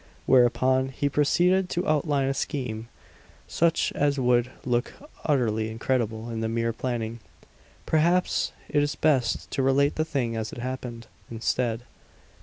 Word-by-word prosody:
Whereupon 130 +1 +3
he 140 +2 -1
proceeded 180 +6 +2
to 175 +2 -2
outline 145 -3 +1
a 135 - +1
scheme 125 -5 -3 0.6
such 165 0 +1
as 145 0 +1
would 125 -1 +2 0.2
look 120 0 0 0.3
utterly 110 -7 +1
incredible 115 0 -2
in 115 - -3
the 110 0 -1
mere 115 0 0
planning. 115 -1 -3 0.7
Perhaps 170 +3 +2 0.2
it 145 - +2
is 145 -1 -1
best 135 -6 +1
to - - 0
relate 135 +2 +2
the 155 - +2
thing 130 -7 -2
as 110 -1 -3
it - - -9
happened, 120 -1 -5 0.2
instead. 115 0 -1
130 Hz, 140 wpm, -26 LUFS, 115-145 Hz, 0.7 s, Whereupon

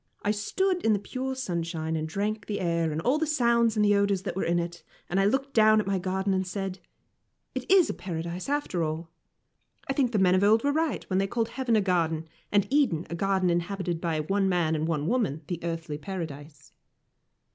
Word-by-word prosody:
I 205 - +2
stood 360 - 0
in 220 - +4
the - - +2
pure 260 +6 -4
sunshine 170 -8 -3
and 155 0 -2
drank 210 +4 -2
the 205 - -2
air 170 -2 0
and 150 - -2
all 275 +5 +2
the 320 - 0
sounds 235 -6 +3
and 210 -1 +3
the 205 - +4
odours 200 -2 +2
that 195 - -4
were 190 - -1
in 170 +1 +1
it; 170 0 -3 0.3
and 190 - 0
I 195 - +3
looked 270 +6 0
down 215 -1 +6
at 210 - -1
my 195 -1 0
garden 190 +2 -1
and 190 -1 0
said, 190 0 -4 0.7
"It - - -5
is 375 -2 +5
Paradise, 175 +2 -5
after 285 -11 -1
all. 160 +1 -3 0.8
I 270 - 0
think 270 -3 +1
the 220 - +1
men 185 -2 +4
of 185 +1 +3
old 220 +2 +4
were 285 0 +2
right 320 0 -1
when 185 0 +1
they 195 - +1
called 230 +2 -1
heaven 245 -1 0
a 215 - +4
garden, 165 -4 0 0.2
and 205 -1 +3
Eden 265 - +2
a - - -2
garden 190 0 +1
inhabited 175 -1 -2
by 160 -2 0
one 195 +5 +1
man 170 -3 +1
and 155 0 -1
one 150 -3 -1
woman, 185 - 0
the 175 +1 -4
Earthly 165 -3 -4
Paradise." 150 -4 -7
190 Hz, 215 wpm, -27 LUFS, 170-220 Hz, 0.8 s, down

